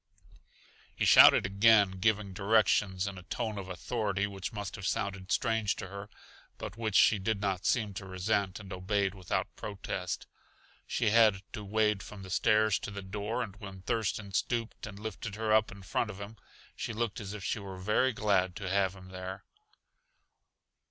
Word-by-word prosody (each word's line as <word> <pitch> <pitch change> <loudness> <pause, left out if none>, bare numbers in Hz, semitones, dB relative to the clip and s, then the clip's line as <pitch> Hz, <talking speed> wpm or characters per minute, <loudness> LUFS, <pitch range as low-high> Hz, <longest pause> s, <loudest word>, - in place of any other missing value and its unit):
He - - 0
shouted - - +8
again, 100 -1 +4
giving 105 -1 +1
directions 100 -2 +2
in 100 -2 -5
a - - -11
tone 105 +3 -3
of 95 -1 -7
authority 100 +1 -1
which 100 -2 -5
must 105 -2 -5
have 95 -2 -4
sounded 100 -1 -2
strange 110 -4 +1
to 95 - -7
her, 100 +1 -8 0.5
but - - -6
which 110 -3 -3
she 105 - +6
did 105 +1 -1
not 95 -2 -1
seem 110 -4 +1
to 95 0 -7
resent 95 +1 -1
and 100 -2 -8
obeyed 95 +1 0
without 95 -3 -3
protest. 100 -2 -4 0.6
She 105 - +1
had 110 -4 +5
to 105 - -5
wade 105 0 +1
from 100 -1 -10
the 95 - -9
stairs 110 +2 +3
to - - -6
the 100 -1 -7
door 105 +5 -3
and 105 -4 -8
when 95 -3 -9
Thurston 100 -2 -2
stooped 115 +2 -2
and 100 -2 -9
lifted 105 0 -6
her 110 0 0
up 110 0 +4
in 100 0 -11
front 105 +4 -1
of 100 -2 -8
him, 100 +2 -8 0.4
she 115 - -4
looked 110 -2 -2
as 105 -1 -6
if 105 - -7
she 105 - -1
were 95 -2 -8
very 105 +7 +2
glad 95 -5 +1
to 95 - -5
have 95 -1 +2
him 95 -1 -13
there. 95 +1 -7
100 Hz, 180 wpm, -31 LUFS, 95-110 Hz, 0.6 s, shouted